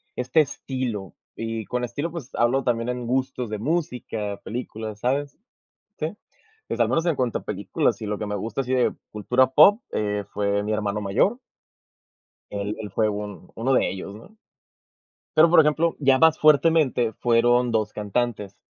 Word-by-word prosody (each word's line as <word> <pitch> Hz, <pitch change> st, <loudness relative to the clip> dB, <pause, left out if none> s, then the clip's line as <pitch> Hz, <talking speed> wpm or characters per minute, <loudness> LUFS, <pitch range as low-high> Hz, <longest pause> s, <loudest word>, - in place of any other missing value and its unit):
este 125 Hz, +5 st, +2 dB
estilo 130 Hz, -, -4 dB, 0.2 s
y 115 Hz, -1 st, -4 dB
con 125 Hz, 0 st, -3 dB
estilo, 145 Hz, +8 st, -3 dB
pues, 155 Hz, -6 st, -7 dB
hablo 125 Hz, +3 st, +2 dB
también 120 Hz, 0 st, 0 dB
en 125 Hz, -1 st, -3 dB
gustos 130 Hz, -1 st, -1 dB
de 105 Hz, -1 st, -4 dB
música, 120 Hz, -8 st, -3 dB
películas, 110 Hz, -3 st, -6 dB
¿sabes?, 140 Hz, +4 st, -1 dB, 0.6 s
sí. 160 Hz, +6 st, -3 dB, 0.5 s
Pues, -, -, -4 dB
al -, -, +4 dB
menos 165 Hz, -, +1 dB
en 165 Hz, -, +1 dB
cuanto 125 Hz, -3 st, -1 dB
a -, -, -20 dB
películas 105 Hz, -, -1 dB
y 110 Hz, -, -3 dB
lo 105 Hz, 0 st, -2 dB
que 105 Hz, -, -4 dB
me 105 Hz, -, -3 dB
gusta 110 Hz, +6 st, -3 dB
así 125 Hz, -, -4 dB
de 125 Hz, -2 st, +2 dB, 0.2 s
cultura 125 Hz, +5 st, +2 dB
pop, 205 Hz, -, +6 dB
eh, 105 Hz, -1 st, -1 dB
fue 100 Hz, 0 st, 0 dB
mi 105 Hz, -, -2 dB
hermano 105 Hz, -1 st, -1 dB
mayor. 105 Hz, -, +1 dB, 1.1 s
Él 100 Hz, +1 st, -3 dB
él 105 Hz, -3 st, -6 dB
fue 110 Hz, +2 st, +1 dB
un 105 Hz, -3 st, -6 dB
uno 120 Hz, +4 st, 0 dB
de -, -, +2 dB
ellos, 95 Hz, +1 st, -7 dB
¿no? 180 Hz, -, -14 dB, 1.0 s
Pero, 160 Hz, +2 st, +7 dB
por 175 Hz, -, +7 dB
ejemplo, 155 Hz, +2 st, +2 dB
ya 135 Hz, -2 st, +4 dB
más 160 Hz, -1 st, +5 dB
fuertemente 150 Hz, -6 st, +4 dB
fueron 120 Hz, +1 st, +3 dB
2 110 Hz, -2 st, 0 dB
cantantes. 105 Hz, -1 st, -2 dB
120 Hz, 170 wpm, -24 LUFS, 105-135 Hz, 1.1 s, Pero